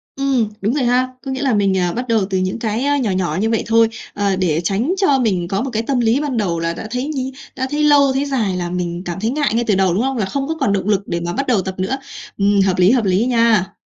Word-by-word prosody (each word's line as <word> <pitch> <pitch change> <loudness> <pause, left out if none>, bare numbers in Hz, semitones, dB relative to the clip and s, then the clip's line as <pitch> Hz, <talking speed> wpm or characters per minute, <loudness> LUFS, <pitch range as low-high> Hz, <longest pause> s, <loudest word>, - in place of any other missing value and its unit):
Ừm, 265 -5 +1
đúng 215 +5 0
rồi 290 - 0
ha. 250 +1 +2 0.2
Có 270 - -3
nghĩa 265 +1 -3
là 270 -4 +1
mình, 200 -2 +2
à, 180 -1 +1
bắt 250 +2 -4
đầu 225 -4 +2
từ 190 - 0
những 185 +4 -2
cái, 225 +2 -2
á, 285 0 +2
nhỏ 235 -8 0
nhỏ 185 -1 -1
như 220 - +1
vậy 225 - 0
thôi. 230 0 +4 0.3
Ờ, 200 -2 0
để 170 -3 0
tránh 215 - 0
cho 290 -9 +3
mình 190 -8 0
có 195 +4 -1
một 270 - -3
cái 220 - 0
tâm 255 +1 0
lý 235 +3 +2
ban 280 -5 -2
đầu 175 -6 0
là 165 0 -1
đã 215 - -7
thấy 250 +2 -2
nhi 265 -3 -3 0.2
đã 260 0 -2
thấy 300 +1 0
lâu, 285 -2 +5
thấy 270 +2 0
dài 225 -9 -1
là 175 -1 -3
mình 175 -1 -3
cảm 175 +1 -4
thấy 220 +3 -1
ngại 295 0 0
ngay 235 +1 +1
từ 205 - +3
đầu, 190 -2 +2
đúng 210 - +1
không? 270 -1 -1
Là 210 - 0
không 275 +8 -3
có 320 - -2
còn 205 -8 +1
động 195 0 -1
lực 200 -1 +1
để 170 - -2
mà 170 +1 -3
bắt 275 +1 -2
đầu 230 -7 +2
tập 190 0 -5
nữa. 195 +8 -1 0.4
Ừm, 200 0 +3
hợp 185 -2 +1
lý, 185 +4 +5
hợp 240 -5 +2
lý 190 +4 +2
nha. 230 -6 +2
220 Hz, 300 wpm, -18 LUFS, 190-265 Hz, 0.4 s, lâu